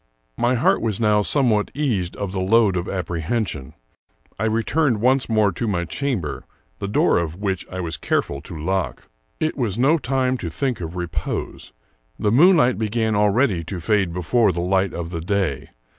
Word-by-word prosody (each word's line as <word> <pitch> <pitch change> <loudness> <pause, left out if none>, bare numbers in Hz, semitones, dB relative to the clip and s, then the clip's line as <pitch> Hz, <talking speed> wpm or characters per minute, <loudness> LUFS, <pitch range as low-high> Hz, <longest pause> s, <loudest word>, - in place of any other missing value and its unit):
My 120 - +1
heart 120 - +2
was 110 -4 -1
now 105 -2 +3
somewhat 110 -3 +1
eased 110 -12 -1
of 100 -2 -4
the 95 - -3
load 100 0 +3
of 90 0 -2
ap 90 -3 -2
prehension. 85 - -3 0.7
I 110 - 0
returned 115 +3 +1
once 130 +3 +2
more 110 -3 +3
to 115 +6 -3
my 85 -4 -1
chamber, 105 - -3 0.3
the 100 - -3
door 100 - +3
of 85 -1 -3
which 95 -1 -3
I 95 0 -4
was 80 -2 -4
careful 70 -2 -1
to 85 +1 -9
lock. 95 +4 -2 0.3
It 155 0 0
was 115 -6 -2
no 145 +7 +3
time 130 0 0
to 85 - -4
think 125 - -2
of 85 +1 -5
repose. 85 -4 -4 0.5
The 105 - 0
moonlight 140 - +5
began 110 0 0
already 105 -2 +2
to 95 +1 -5
fade 95 0 +1
before 95 +5 +2
the 85 - -4
light 95 +1 +1
of 85 -1 -5
the 85 -2 -4
day. 90 -6 -1
100 Hz, 180 wpm, -22 LUFS, 90-120 Hz, 0.7 s, moonlight